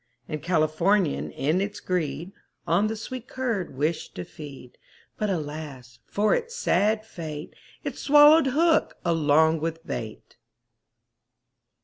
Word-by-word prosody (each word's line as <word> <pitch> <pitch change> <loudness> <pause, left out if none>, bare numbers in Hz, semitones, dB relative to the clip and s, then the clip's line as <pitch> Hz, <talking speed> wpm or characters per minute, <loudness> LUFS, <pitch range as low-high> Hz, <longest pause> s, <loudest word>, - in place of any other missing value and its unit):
And 155 -1 -4
Californian 170 +1 +1
in 155 +7 0
its 205 +1 -3
greed, 170 -2 -2 0.3
On 175 +5 +2
the 220 - -2
sweet 250 +2 -7
curd 230 - -3
wished 155 +4 -2
to 90 - -5
feed; 140 -5 -11 0.4
But, 210 - 0
alas, 145 -7 -5
for 210 +1 +2
it's 475 0 -2
sad 215 - +1
fate, 155 -6 -7 0.3
It - - -5
swallowed 295 +1 +7
hook 320 +5 +2
along 160 -1 +3
with 165 +1 -4
bait. 110 -3 -7
170 Hz, 120 wpm, -26 LUFS, 150-215 Hz, 0.4 s, swallowed